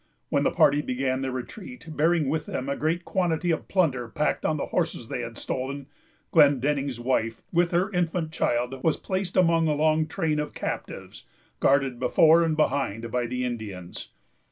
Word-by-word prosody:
When - - +2
the - - +3
party 145 +1 +4
began 130 -1 -1
their 135 -1 -2
retreat, 185 - -8
bearing 160 -1 +2
with 150 +2 -1
them 130 - -4
a 140 - -1
great 165 +3 -1
quantity 175 -2 0
of 160 - -2
plunder 140 -11 +1
packed 150 +7 0
on 155 - 0
the - - -2
horses 160 -9 -2
they 125 - -3
had 115 -1 -7
stolen, 135 +2 -4 0.5
Glendenning's 140 -3 +3
wife, 115 -2 -1
with 175 0 +3
her 180 +4 +1
infant 175 -3 -1
child, 125 -2 -1
was 160 - +2
placed 190 -1 -3
among 165 -2 +4
a 150 - +1
long 155 +1 +2
train 160 -3 -1
of 150 - -4
captives - - -6 0.3
guarded 135 -3 +2
before 155 +6 +5
and 160 -2 +1
behind 115 -7 0
by 125 0 0
the 125 +1 -2
Indians. 105 -7 -6
150 Hz, 175 wpm, -26 LUFS, 125-165 Hz, 0.5 s, before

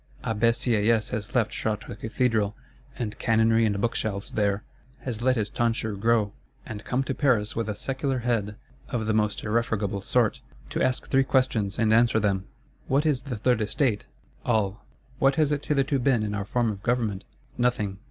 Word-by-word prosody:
Abbé 115 +1 +2
Sieyes 115 -1 +2
has 110 +4 -4
left 115 -4 +2
Chartres 105 -2 -3
Cathedral, 110 -3 0 0.4
and 115 -5 -4
canonry 115 0 +3
and 100 -1 -1
book 115 +3 0
shelves 100 -2 -3
there; 100 0 0 0.4
has 120 -4 -4
let 130 +1 +3
his 110 -4 0
tonsure 115 -2 0
grow, 110 0 +2 0.3
and 105 -1 -7
come 130 +2 0
to 135 - -2
Paris 125 -6 +1
with 115 -1 -2
a 105 - -2
secular 135 +4 -2
head, 115 -4 -1 0.3
of 120 -4 -2
the 110 - +1
most 105 -1 0
irrefragable 105 -3 0
sort, 115 +2 +1 0.3
to - - -1
ask 130 -1 0
three 135 0 +3
questions, 120 -7 +1
and 110 -1 +3
answer 115 -1 +4
them: 100 -2 0 0.4
_What 140 +3 +2
is 145 -5 +2
the 130 -5 -5
Third 120 +1 +2
Estate? 105 0 0 0.4
All.—What 120 +5 -1
has 150 -1 +2
it 145 -1 -1
hitherto 140 -1 +2
been 125 -3 +2
in 105 -1 -2
our 100 -1 -2
form 120 +1 +1
of 100 -2 -8
government? 115 -5 0 0.4
Nothing. 105 -5 0
115 Hz, 175 wpm, -26 LUFS, 105-125 Hz, 0.4 s, answer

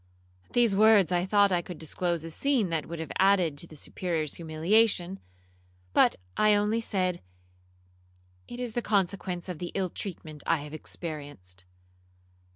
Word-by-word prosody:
At - - -27
these 235 -4 +3
words 210 -3 +6
I 180 +1 +1
thought 205 0 +4
I 175 -1 +2
could 175 -1 -8
disclose 170 +1 -2
a 165 - -6
scene 255 - +1
that 165 -2 -1
would 170 - -5
have 160 -3 -5
added 185 -5 +4
to 170 - -6
the 155 - -12
Superior's 160 0 -3
humiliation, 175 +3 +1 0.7
but - - +5 0.2
I 215 0 +5
only 210 +3 +1
said, 185 -5 -1 1.3
'It 240 - -8
is 245 -3 -3
the 240 - 0
consequence 190 -4 -1
of 180 -4 -5
the 175 - -5
ill 190 -2 0
treatment 155 -6 -6
I - - +4
have 150 0 -9
experienced.' 145 - -7
180 Hz, 160 wpm, -28 LUFS, 160-205 Hz, 1.3 s, words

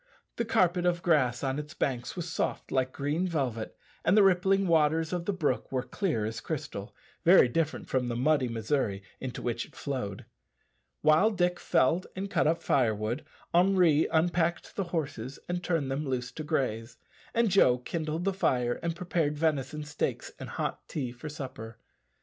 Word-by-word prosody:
The 235 - 0
carpet 180 -5 +2
of 175 -1 0
grass 135 -8 +2
on 135 +1 0
its 150 +1 -8
banks 125 -2 -2
was 175 -2 -4
soft 165 - -2
like 130 -1 +1
green 145 +7 -1
velvet, 130 -10 -2 0.3
and 185 - +4
the 210 - +8
rippling 195 +1 +4
waters 160 0 +2
of 175 -1 -2
the 205 - +1
brook 180 -7 -1
were 130 -2 0
clear 155 - -1
as 110 +1 -4
crystal - - -5 0.3
very - - +7
different 155 +4 -1
from 130 -2 0
the 120 - -2
muddy 135 +1 +2
Missouri 110 -3 -1 0.2
into 130 -2 -5
which 120 -1 -1
it - - -15
flowed. 125 -9 -4 0.8
While 155 +8 +5
Dick 180 -4 0
Varley - - -16
felled 170 +8 +3
and 195 +1 -4
cut - - +2
up 165 +1 +1
firewood, 115 0 +1 0.3
Henri 175 -4 +4
unpacked 170 +1 0
the 195 - -1
horses 140 -7 -4
and 175 0 -2
turned 160 -6 0
them 140 +3 -1
loose 125 -1 -2
to 155 - -6
graze, 120 -6 -2 0.4
and 230 -3 +3
Joe 130 -10 +5
kindled 155 +5 -3
the 195 +1 +1
fire 125 -9 +1
and 170 -1 -2
prepared 165 -4 -1
venison 150 -1 0
steaks 145 0 -3
and - - -7
hot - - -3
tea 130 -5 -3
for 125 +5 -8
supper. 125 -6 -7
150 Hz, 175 wpm, -29 LUFS, 125-175 Hz, 0.8 s, the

